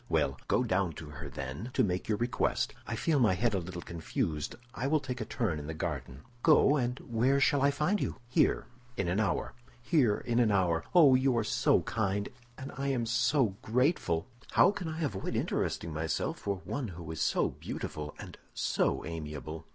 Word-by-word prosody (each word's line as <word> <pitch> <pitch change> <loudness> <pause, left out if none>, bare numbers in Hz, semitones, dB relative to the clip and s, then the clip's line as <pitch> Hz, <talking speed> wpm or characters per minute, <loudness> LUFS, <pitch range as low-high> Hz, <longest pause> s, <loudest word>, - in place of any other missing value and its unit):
"Well, - - +1
go 125 - +2
down 95 -6 0
to 75 0 -9
her, 75 0 -7
then, 70 - -5
to 130 - +4
make 90 -1 -1
your 105 - +2
request. 120 +1 0
I 115 - -2
feel 150 +5 +1
my 105 -7 +4
head 115 +3 +1
a 95 - +1
little 85 0 -7
confused; 80 -2 -3 0.2
I 130 +1 -2
will 155 +2 +3
take 125 -3 -5
a - - -2
turn 80 -6 -1
in 75 - -7
the 80 - -4
garden." 70 -4 -4 0.2
"Go; 150 -1 +5
and 125 -2 0
where 125 +4 +2
shall 140 0 +3
I 140 - +5
find 150 +8 +1
you?" - - -1
"Here, 125 - +2 0.3
in 100 - 0
an 90 +4 +1
hour." 110 - 0 0.3
"Here, 125 -5 +3
in 120 0 0
an 120 -3 +4
hour. 85 -4 +2
Oh, 150 -7 +8
you 130 -1 +3
are 115 - +2
so - - +2
kind, 100 -2 -1 0.3
and 135 - -7
I 140 +2 -2
am 130 -4 0
so 120 -2 +2
grateful!" 125 - +1 0.3
"How 190 - +6
can 190 -4 -5
I 160 +1 -3
avoid 105 -10 -2
interesting 80 - -1
myself 80 +1 -2
for 100 -2 -3
one 140 -4 -3
who 85 -4 -7
is 80 - -4
so - - +2
beautiful 75 0 -6
and - - -10 0.2
so - - 0
amiable? 75 0 -6
110 Hz, 200 wpm, -31 LUFS, 85-130 Hz, 0.3 s, Oh